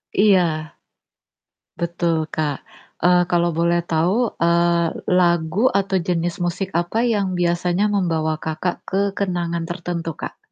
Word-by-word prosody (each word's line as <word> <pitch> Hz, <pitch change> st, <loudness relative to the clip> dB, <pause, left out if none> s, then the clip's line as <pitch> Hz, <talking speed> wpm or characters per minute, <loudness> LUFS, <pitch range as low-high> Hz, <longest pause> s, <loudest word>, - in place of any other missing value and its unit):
Iya. 200 Hz, -2 st, +5 dB, 1.4 s
Betul 170 Hz, 0 st, 0 dB, 0.2 s
Kak. 150 Hz, -3 st, -1 dB, 0.5 s
Eee, 180 Hz, 0 st, +5 dB
kalau 175 Hz, -1 st, +2 dB
boleh 170 Hz, +1 st, +2 dB
tahu, 165 Hz, +3 st, +2 dB, 0.3 s
eee, 170 Hz, 0 st, +3 dB, 0.3 s
lagu 175 Hz, +1 st, +2 dB, 0.2 s
atau 195 Hz, -1 st, 0 dB
jenis 175 Hz, -1 st, 0 dB
musik 180 Hz, +2 st, -2 dB
apa 175 Hz, +6 st, 0 dB
yang 200 Hz, -2 st, 0 dB
biasanya 175 Hz, +2 st, +1 dB
membawa 165 Hz, -5 st, 0 dB
Kakak 160 Hz, +3 st, -2 dB
ke 195 Hz, +1 st, +1 dB, 0.2 s
kenangan 175 Hz, -3 st, -1 dB
tertentu 175 Hz, -1 st, -4 dB
Kak? -, -, -6 dB
175 Hz, 120 wpm, -21 LUFS, 170-180 Hz, 1.4 s, Iya